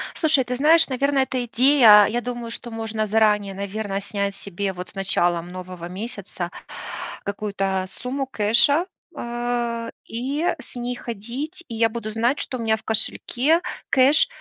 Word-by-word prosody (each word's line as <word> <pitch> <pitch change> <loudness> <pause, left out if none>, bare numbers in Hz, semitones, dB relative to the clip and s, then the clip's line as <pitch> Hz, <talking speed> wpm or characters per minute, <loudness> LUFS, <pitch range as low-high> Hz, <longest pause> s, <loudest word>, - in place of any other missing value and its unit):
Слушай, 310 -5 +3
ты 250 0 -3
знаешь, 315 +5 +5
наверное, 275 +1 +2
эта 255 -1 -2
идея, 235 -4 +7
я 240 +4 -1
думаю, 240 -1 -5
что 240 - -6
можно 220 -1 -2
заранее, 210 -2 +3
наверное, 200 0 -3
снять 200 0 -2
себе 200 0 -3
вот 180 0 -7
с - - -17
началом 175 -3 0
нового 180 -1 -7
месяца 190 -3 -6 0.7
какую-то 195 -2 -2
сумму 260 +6 -4
кэша, 265 - +3 0.3
а, 240 -2 -2 0.2
и 270 +8 -2
с - - -10
ней 245 0 -3
ходить, 240 - -6
и 230 - -6
я 225 0 +3
буду 220 -1 -5
знать, 235 +6 +1
что 255 - -3
у 235 - -5
меня 220 -1 +2
в 220 - -16
кошельке 245 - +1 0.3
кэш 275 - +5
230 Hz, 155 wpm, -23 LUFS, 200-255 Hz, 0.7 s, идея